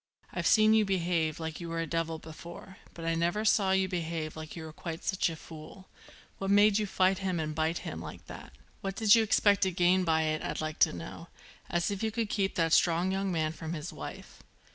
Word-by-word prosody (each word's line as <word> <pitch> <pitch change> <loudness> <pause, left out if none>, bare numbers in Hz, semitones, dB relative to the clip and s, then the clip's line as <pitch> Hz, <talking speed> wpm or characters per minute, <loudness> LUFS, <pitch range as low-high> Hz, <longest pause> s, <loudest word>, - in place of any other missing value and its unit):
"I've - - -1
seen 215 0 +6
you 220 -1 +5
behave 170 -4 0
like 160 -1 -5
you 170 - -6
were 165 0 -3
a 165 - -1
devil 165 0 -2
before, 170 +4 -11 0.2
but 165 - -7
I 165 - +1
never 175 +6 0
saw 200 -3 +3
you 190 0 +2
behave 165 -3 -3
like 155 -1 -8
you 165 - -7
were 160 -1 -9
quite 165 +1 -6
such 190 -2 +1
a 165 - -5
fool. 160 +4 -12 0.5
What 195 - -2
made 205 +1 +5
you 210 - -1
fight 190 0 +2
him 185 -3 -1
and 155 -1 -2
bite 160 +2 0
him 80 - -5
like 85 - -9
that? - - -10 0.3
What 195 -1 -4
did 215 -1 +5
you 230 - +7
expect 205 -2 +3
to 190 - +3
gain 180 +1 +3
by 160 -2 +2
it 155 0 -1
I'd - - -3
like 155 0 -4
to - - +5
know? 85 -2 -8 0.4
As 175 +2 0
if 200 - -4
you 220 - +1
could 220 -1 -2
keep 195 -2 0
that 165 -1 +1
strong 175 +2 +3
young 195 0 -1
man 160 -2 0
from 160 0 -6
his 155 +1 -6
wife." - - -9
170 Hz, 230 wpm, -30 LUFS, 160-195 Hz, 0.5 s, you